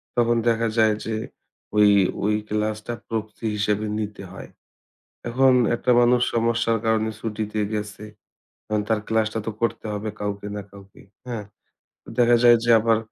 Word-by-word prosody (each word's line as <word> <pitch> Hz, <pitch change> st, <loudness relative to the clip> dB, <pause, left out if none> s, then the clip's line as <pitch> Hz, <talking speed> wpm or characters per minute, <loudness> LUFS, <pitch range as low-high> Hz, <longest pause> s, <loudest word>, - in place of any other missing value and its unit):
তখন 120 Hz, 0 st, +3 dB
দেখা 115 Hz, 0 st, +2 dB
যায় 110 Hz, -1 st, +4 dB
যে 110 Hz, -, -2 dB, 0.6 s
ওই 105 Hz, -1 st, +6 dB, 0.3 s
ওই 105 Hz, +1 st, +2 dB
ক্লাসটা 105 Hz, +2 st, -2 dB
প্রক্সি 110 Hz, 0 st, -5 dB
হিসেবে 105 Hz, +1 st, 0 dB
নিতে 105 Hz, -2 st, -5 dB
হয়। 95 Hz, -, -10 dB, 0.8 s
এখন 130 Hz, +2 st, +4 dB, 0.2 s
একটা 125 Hz, +1 st, 0 dB
মানুষ 120 Hz, 0 st, +4 dB
সমস্যার 115 Hz, 0 st, +1 dB
কারণে 110 Hz, 0 st, +1 dB
ছুটিতে 110 Hz, -1 st, -3 dB, 0.2 s
গেছে। 105 Hz, 0 st, -5 dB, 0.6 s
এখন 105 Hz, -1 st, +1 dB
তার 110 Hz, -1 st, +2 dB
ক্লাসটা 110 Hz, 0 st, 0 dB
তো 115 Hz, -, -2 dB
করতে 115 Hz, -, -1 dB
হবে 105 Hz, +1 st, -4 dB
কাউকে 105 Hz, 0 st, -4 dB
না 105 Hz, -, -4 dB
কাউকে, 100 Hz, -1 st, -15 dB, 0.3 s
হ্যাঁ? 115 Hz, -4 st, -4 dB, 0.6 s
তো -, -, -23 dB
দেখা 120 Hz, 0 st, +5 dB
যায় 120 Hz, -1 st, +8 dB
যে 120 Hz, -, +2 dB
আবার 115 Hz, 0 st, +2 dB
110 Hz, 150 wpm, -23 LUFS, 105-115 Hz, 0.8 s, যায়